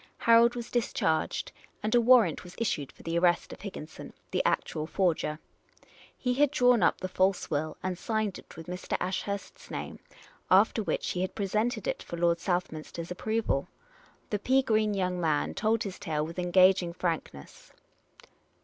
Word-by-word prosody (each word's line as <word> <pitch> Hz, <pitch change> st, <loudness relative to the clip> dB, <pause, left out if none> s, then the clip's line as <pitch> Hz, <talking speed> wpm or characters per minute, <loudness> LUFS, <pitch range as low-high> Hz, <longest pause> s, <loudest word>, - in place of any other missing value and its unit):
Harold 230 Hz, +1 st, +5 dB
was 240 Hz, -1 st, -6 dB
discharged, 165 Hz, -9 st, 0 dB, 0.3 s
and 215 Hz, -, 0 dB
a 240 Hz, -, +5 dB
warrant 230 Hz, -9 st, +5 dB
was 180 Hz, 0 st, -12 dB
issued 150 Hz, -, -2 dB
for -, -, -18 dB
the 165 Hz, +1 st, 0 dB
arrest 175 Hz, -1 st, +2 dB
of -, -, -12 dB
Higginson, 160 Hz, -6 st, -8 dB, 0.2 s
the -, -, +1 dB
actual 155 Hz, 0 st, -1 dB
forger. 165 Hz, -5 st, 0 dB, 0.8 s
He 250 Hz, -1 st, 0 dB
had 290 Hz, +3 st, +3 dB
drawn 250 Hz, -4 st, +4 dB
up -, -, +3 dB
the 185 Hz, -, -3 dB
false 185 Hz, 0 st, 0 dB
will 155 Hz, +1 st, -2 dB
and 180 Hz, -1 st, -3 dB
signed 220 Hz, -2 st, -1 dB
it -, -, -15 dB
with 165 Hz, -, -8 dB
Mr. 180 Hz, +1 st, -3 dB
Ashurst's 195 Hz, +2 st, -4 dB
name, -, -, -6 dB, 0.5 s
after -, -, +4 dB
which -, -, -2 dB
he 180 Hz, -, -2 dB
had 185 Hz, -, -3 dB
presented 215 Hz, +2 st, -1 dB
it -, -, -2 dB
for 170 Hz, -, -7 dB
Lord 170 Hz, 0 st, +2 dB
Southminster's 170 Hz, -1 st, -3 dB
approval. 215 Hz, -6 st, -1 dB, 0.6 s
The 210 Hz, -, 0 dB
pea 265 Hz, +5 st, +3 dB
green 215 Hz, -3 st, +1 dB
young 180 Hz, -2 st, -1 dB
man 155 Hz, -3 st, +1 dB
told 215 Hz, +2 st, +1 dB
his 195 Hz, -3 st, -6 dB
tale 155 Hz, -5 st, -2 dB
with 165 Hz, +3 st, -7 dB
engaging 180 Hz, 0 st, +4 dB
frankness. 165 Hz, -, -5 dB
185 Hz, 165 wpm, -29 LUFS, 170-220 Hz, 0.8 s, Harold